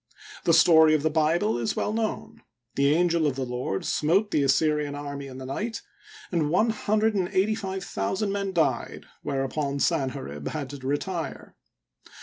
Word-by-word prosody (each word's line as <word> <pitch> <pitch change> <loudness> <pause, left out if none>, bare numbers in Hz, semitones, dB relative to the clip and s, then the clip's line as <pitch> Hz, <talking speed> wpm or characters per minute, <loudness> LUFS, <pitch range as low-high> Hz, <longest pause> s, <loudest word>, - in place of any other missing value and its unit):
The 165 - +4
story 160 -1 +6
of 150 - -1
the 160 - +1
Bible 155 -7 +1
is 115 - -1
"well 210 - -1
known. 220 -1 -3 0.3
The 140 +1 +3
angel 170 0 +2
of 140 - -1
the 135 -1 -2
Lord 125 -6 -3
smote 190 +8 +1
the 150 - +2
Assyrian 145 +1 +1
army 140 -1 -6
in 130 -1 -9
the 130 - -7
night 220 - -4 0.5
and 160 -5 +1
one 215 +8 +3
hundred 215 0 +1
and 190 -3 0
eighty 195 +3 +2
five 190 -3 -4
thousand 190 - -2
men 200 -1 -2
died, 165 -5 -1 0.2
whereupon 140 0 -2
Sanherib 130 - -1
had 145 -4 -4
to 145 - -7
retire. 145 +5 -4
155 Hz, 165 wpm, -26 LUFS, 140-190 Hz, 0.5 s, story